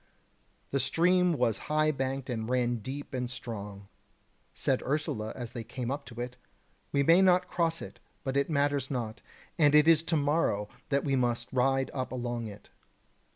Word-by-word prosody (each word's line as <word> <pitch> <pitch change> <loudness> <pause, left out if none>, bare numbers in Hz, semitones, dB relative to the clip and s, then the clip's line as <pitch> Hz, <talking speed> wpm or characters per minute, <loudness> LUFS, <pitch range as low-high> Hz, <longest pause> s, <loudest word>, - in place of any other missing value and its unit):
The 140 - +1
stream 175 +6 +3
was 120 -6 +1
high 155 0 +3
banked 135 -1 -3
and 115 -3 -3
ran 120 -1 +1
deep 135 +7 -7
and 125 -1 -2
strong. 105 -5 -7 0.6
Said - - 0
Ursula 130 -7 -2
as 120 -2 -6
they 120 -2 -5
came 125 +2 -4
up 140 +1 -4
to 115 -1 -10
it: 125 +1 -5 0.5
"We 140 - +2
may 165 +6 +6
not 180 -1 +4
cross 165 -1 0
it, - - -10 0.2
but 135 -1 -2
it 140 +2 +2
matters 140 -2 +1
not; 120 -4 -3 0.4
and 150 -2 +5
it 150 +1 +6
is 165 -2 +7
to 165 - +1
morrow 145 -9 +1 0.2
that 140 -1 +1
we 135 -2 +1
must 120 -1 -1
ride 135 +1 +2
up 130 -2 -3
along 120 -2 -3
it." 100 -1 -12
130 Hz, 175 wpm, -30 LUFS, 120-150 Hz, 0.6 s, is